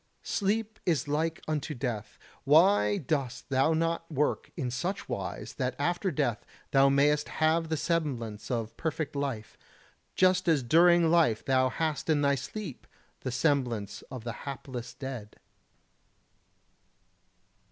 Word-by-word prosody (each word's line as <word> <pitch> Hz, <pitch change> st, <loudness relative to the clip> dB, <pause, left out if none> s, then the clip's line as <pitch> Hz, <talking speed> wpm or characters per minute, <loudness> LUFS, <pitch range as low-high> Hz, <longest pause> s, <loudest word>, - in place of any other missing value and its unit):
Sleep 220 Hz, +2 st, -1 dB
is 160 Hz, -5 st, +1 dB
like 160 Hz, +3 st, -1 dB
unto 155 Hz, -1 st, -2 dB
death. 115 Hz, -5 st, -4 dB, 0.3 s
Why 185 Hz, +8 st, +5 dB
dost 135 Hz, -6 st, -2 dB
thou 135 Hz, +4 st, +3 dB
not 165 Hz, +1 st, -1 dB
work 150 Hz, 0 st, 0 dB
in 130 Hz, -6 st, -2 dB
such 175 Hz, +11 st, -3 dB
wise -, -, -5 dB
that 125 Hz, 0 st, -1 dB
after 175 Hz, +6 st, 0 dB
death 120 Hz, -8 st, -1 dB, 0.3 s
thou 135 Hz, 0 st, +5 dB
mayst 145 Hz, +2 st, +3 dB
have 160 Hz, +1 st, +1 dB
the 160 Hz, -, 0 dB
semblance 130 Hz, -11 st, -2 dB
of 115 Hz, -3 st, -2 dB
perfect 155 Hz, -2 st, -3 dB
life, 135 Hz, -7 st, -4 dB, 0.6 s
just 185 Hz, 0 st, +3 dB
as 155 Hz, -6 st, +3 dB
during 170 Hz, +4 st, +5 dB
life 160 Hz, -11 st, +3 dB
thou 130 Hz, -1 st, +3 dB
hast 155 Hz, +1 st, -2 dB
in 150 Hz, -2 st, +3 dB
thy 140 Hz, 0 st, +4 dB
sleep 140 Hz, -, -6 dB, 0.3 s
the 130 Hz, -, -4 dB
semblance 125 Hz, -6 st, 0 dB
of 130 Hz, -4 st, -7 dB
the 115 Hz, -1 st, -4 dB, 0.2 s
hapless 125 Hz, -3 st, -7 dB
dead? 125 Hz, -6 st, -7 dB
145 Hz, 130 wpm, -29 LUFS, 125-165 Hz, 0.6 s, Why